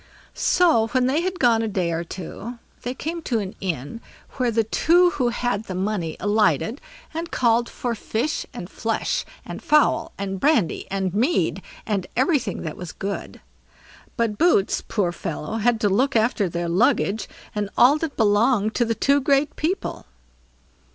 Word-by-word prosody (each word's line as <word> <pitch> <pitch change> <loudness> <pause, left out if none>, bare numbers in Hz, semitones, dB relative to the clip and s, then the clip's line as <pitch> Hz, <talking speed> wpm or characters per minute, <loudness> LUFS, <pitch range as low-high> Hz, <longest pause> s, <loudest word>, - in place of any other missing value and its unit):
So, 320 -12 +3
when 250 +2 +1
they 275 +6 +2
had 365 0 -3
gone 235 -3 +4
a 225 - -1
day 185 -5 -1
or 165 +1 -2
so, 210 +6 -7 0.2
they 250 +2 -4
came 330 +4 -4
to 250 -7 -1
an 200 -3 -3
inn, 175 - -4 0.4
where 250 -2 +1
the 225 0 +2
two 350 - +4
who 250 -6 0
had 230 -3 -2
the 185 - -5
money 185 -4 -2
alighted, 205 - +1 0.3
and 330 +1 -4
called 235 -1 +2
for 245 -2 -3
fish 230 +7 -2
and - - -7
flesh, - - -2 0.2
and - - -7
fowl, 300 0 +3
and 195 -1 -4
brandy 275 - +1
and 190 -2 -1
mead, 245 - +1 0.2
and 195 -4 -1
everything 260 - +1
that 155 -3 -5
was 180 -3 -7
good; 200 0 -5 0.8
but 225 -3 0
Boots, 325 - +3
poor 190 -5 0
fellow, 175 +3 -4
had 225 +1 +2
to 210 - +3
look 250 +8 +1
after 220 -4 +2
their 170 +1 -3
luggage 200 +3 +1 0.2
and 210 -1 -2
all 280 +5 +6
that 320 -3 -4
belonged 215 0 +3
to 240 - +1
the 230 0 -1
two 280 +4 +3
great 275 +2 +2
people. 355 +6 -3
225 Hz, 165 wpm, -23 LUFS, 195-265 Hz, 0.8 s, all